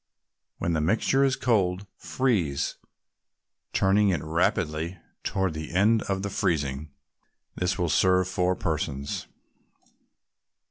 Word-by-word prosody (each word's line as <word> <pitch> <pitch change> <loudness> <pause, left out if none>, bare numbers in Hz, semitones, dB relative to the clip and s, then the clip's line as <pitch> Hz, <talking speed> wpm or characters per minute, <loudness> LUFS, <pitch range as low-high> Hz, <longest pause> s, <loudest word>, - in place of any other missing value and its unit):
When 85 - -1
the 80 - +1
mixture 110 - +2
is 135 -1 +3
cold, 100 -5 +1
freeze, 90 - -1 0.9
turning 100 +1 +3
it 85 -6 0
rapidly 80 +1 0 0.3
toward 95 -3 0
the 80 +1 -6
end 110 +4 +4
of 95 0 -1
the 100 - -2
freezing. 75 -6 -1 0.6
This 90 0 -1
will 90 - 0
serve 90 +2 +3
four 90 0 +1
persons. 75 -5 -3
90 Hz, 110 wpm, -26 LUFS, 80-100 Hz, 0.9 s, end